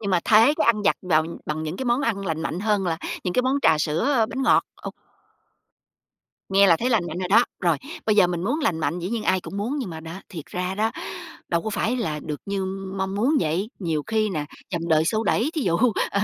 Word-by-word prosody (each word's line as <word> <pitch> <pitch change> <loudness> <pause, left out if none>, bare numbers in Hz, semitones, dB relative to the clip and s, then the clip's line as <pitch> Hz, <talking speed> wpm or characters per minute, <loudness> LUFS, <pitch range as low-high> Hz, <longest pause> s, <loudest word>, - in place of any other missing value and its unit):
nhưng 200 -2 -3
mà 180 -2 +3
thế 225 +7 +6
cái - - +1
ăn 215 -3 +3
vặt 200 - +3
vào 160 -4 +2 0.2
bằng 155 +1 -2
những 160 +3 -4
cái 265 - -4
món 240 +2 +2
ăn 210 -7 -1
lành 160 -2 -2
mạnh 165 +2 -3
hơn 205 -2 +1
là 165 -2 0 0.3
những 180 - -1
cái 250 - +3
món 260 +2 +1
trà 150 - +5
sữa, 220 - +1
bánh 265 - -3
ngọt, - - +4 0.2
ô - - -4 1.6
Nghe 195 +1 +5
là 170 -3 +6
thấy 245 +8 -1
lành 215 -7 +2
mạnh 165 - -5
rồi 180 -1 -3
đó. 230 +5 +6 0.2
Rồi, 170 -4 +2 0.3
bây 215 - +3
giờ 200 - +6
mình 175 -1 -3
muốn 280 +10 0
lành 180 - 0
mạnh 170 +2 -1
dĩ 175 +1 -4
nhiên 225 0 -2
ai 185 -2 +2
cũng 195 - -8
muốn, 240 +9 -2
nhưng 235 -9 -4
mà 160 -1 -7
đó, 165 +4 -8
thiệt 160 -5 -8
ra 180 +1 -3
đó, 215 +3 +1 0.6
đâu 170 -1 0
có 220 - -3
phải 225 +4 0
là 155 -11 -2
được 150 -2 -4
như 200 -1 -2 0.3
mong 190 0 -2
muốn 245 +10 +2
vậy, 175 +7 -1
nhiều 165 -6 -1
khi 220 -1 +1
nè, 155 -5 -2 0.3
dòng 170 -1 -2
đời 160 -1 +4
xô 220 +6 +1
đẩy, 240 +8 +1
thí 310 - -1
dụ, 170 -6 +1 0.3
ờ, 200 - 0
195 Hz, 250 wpm, -24 LUFS, 170-225 Hz, 1.6 s, thế